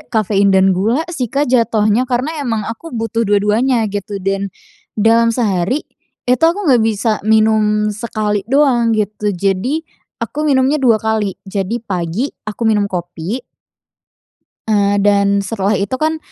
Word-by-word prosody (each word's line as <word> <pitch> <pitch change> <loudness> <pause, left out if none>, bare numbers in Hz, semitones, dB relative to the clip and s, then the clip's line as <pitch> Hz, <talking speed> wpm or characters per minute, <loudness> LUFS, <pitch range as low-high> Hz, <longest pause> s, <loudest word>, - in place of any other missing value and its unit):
kafein 200 -3 +1
dan 190 0 +4
gula 225 - 0
sih, 255 -7 -2
Kak, 280 +6 0
jatuhnya 230 0 +2
karena 270 +6 -1
emang 230 -6 -2
aku 230 +10 -7
butuh 225 -3 -2
dua-duanya 220 +4 +2
gitu 205 0 -4
dan 195 +1 -2 0.5
dalam 230 +2 +4
sehari 220 - 0 0.4
itu 250 0 +1
aku 340 +5 +2
enggak 255 -8 +4
bisa 220 0 +1
minum 215 -1 +2
sekali 210 -1 -3
doang 245 -5 +3
gitu. 210 0 -2
Jadi 200 - -1 0.4
aku 290 - -6
minumnya 275 +1 +2
2 235 -4 +4
kali. 215 -3 -1
Jadi 200 +4 -3
pagi 185 - -2 0.2
aku 215 +2 -6
minum 210 -2 +2
kopi 175 +5 -4 1.3
eee, 205 -2 +2
dan 200 0 +3
setelah 200 -1 0
itu 200 +6 -2
kan, 315 +4 0
220 Hz, 140 wpm, -16 LUFS, 200-245 Hz, 1.3 s, dan